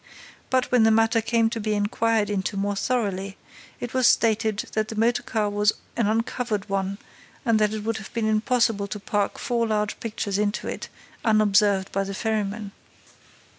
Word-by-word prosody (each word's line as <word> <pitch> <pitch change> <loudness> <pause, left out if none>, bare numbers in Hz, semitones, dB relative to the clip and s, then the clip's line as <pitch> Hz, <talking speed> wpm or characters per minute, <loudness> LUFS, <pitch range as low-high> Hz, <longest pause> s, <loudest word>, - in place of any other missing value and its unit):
But, 255 -1 +1
when 250 -2 +5
the 220 - +6
matter 225 +1 +3
came 225 0 +2
to 230 - -3
be 215 0 -1
inquired 210 +1 +1
into 195 0 -2
more 200 +1 -1
thoroughly, 200 -4 -1 0.4
it 245 - -5
was 255 -2 +4
stated 220 -2 +2
that 215 0 0
the 220 - -6
motor 230 +2 +2
car 215 -2 -1
was 205 +1 +2 0.2
an 230 -3 +1
uncovered 225 -1 -1
one 195 0 -2 0.5
and 230 -2 +3
that 210 -1 +2
it 215 -1 -4
would 225 +1 -1
have 215 - -9
been 230 -2 -1
impossible 220 -1 +1
to 210 - -5
pack 205 0 -1
four 235 -3 0
large 210 -1 -1
pictures 210 -3 -3
into 210 0 -1
it - - -5 0.3
unobserved 205 -3 +3
by 195 - 0
the 195 0 -5
ferryman. 210 -1 -2
215 Hz, 175 wpm, -25 LUFS, 205-225 Hz, 0.5 s, the